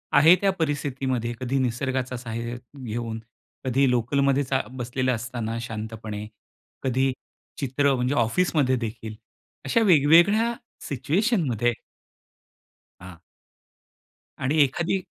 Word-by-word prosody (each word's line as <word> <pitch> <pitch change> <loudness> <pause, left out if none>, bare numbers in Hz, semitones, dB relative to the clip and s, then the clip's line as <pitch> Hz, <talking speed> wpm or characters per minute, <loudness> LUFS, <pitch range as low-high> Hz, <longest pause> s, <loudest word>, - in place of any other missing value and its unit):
आहे 160 +5 +8
त्या 195 - +3
परिस्थितीमध्ये 135 -5 -1
कधी 130 +1 -1
निसर्गाचा 130 +1 -1
सहाय्य 115 0 -5 0.3
घेऊन 115 0 -4 0.5
कधी 130 +1 +3
लोकलमध्ये 135 +3 +2
चा 130 0 0
बसलेला 130 0 -1
असताना 115 -1 -4
शांतपणे, 110 -2 -6 0.6
कधी 130 +1 +1 0.5
चित्र 140 +1 +1
म्हणजे 125 +2 0
ऑफिसमध्ये 130 +2 +2
देखील 110 -2 -5 0.5
अशा 180 +12 +2
वेगवेगळ्या 180 +7 +5 0.3
सिच्युएशनमध्ये 140 - +1 1.3
हां. 90 -2 -10 1.2
आणि 140 +5 0
एखादी 170 +7 -1
130 Hz, 95 wpm, -25 LUFS, 115-145 Hz, 1.3 s, आहे